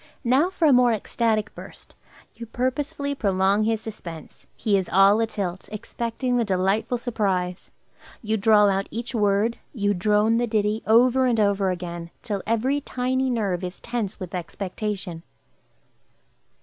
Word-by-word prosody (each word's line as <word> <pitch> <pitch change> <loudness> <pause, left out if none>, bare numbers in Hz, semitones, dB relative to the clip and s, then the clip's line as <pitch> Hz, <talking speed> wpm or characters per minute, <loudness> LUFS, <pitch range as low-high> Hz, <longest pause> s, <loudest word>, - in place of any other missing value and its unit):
Now 265 +8 +3
for 360 -3 0
a 285 - +6
more 250 -1 +5
ecstatic 215 0 -1
burst. - - -12 0.4
You 235 - -9
purposely 280 +4 -2
prolong 200 -3 +1
his 220 -1 0
suspense; 170 -8 -10
he 210 -2 +1
is 190 -2 0
all 195 +3 +5
atilt, 200 -5 -3
expecting 235 +3 -3
the 240 - +2
delightful 195 +4 0
surprise. 195 -7 -2 0.5
You 220 0 0
drawl 210 0 +5
out 195 0 0
each 235 +3 -5
word; 210 +1 +1 0.2
you 205 -2 +1
drone 210 +4 +2
the 240 0 +1
ditty 215 0 0
over 250 +3 +4
and 235 -3 +1
over 200 -2 +2
again, 175 -2 -5
till 205 -3 -3
every 255 +6 +1
tiny 260 0 -1
nerve 200 -7 -1
is 180 +1 -6
tense 230 -4 -4
with 185 -3 -7
expectation. 185 0 -4
215 Hz, 145 wpm, -24 LUFS, 195-240 Hz, 0.5 s, a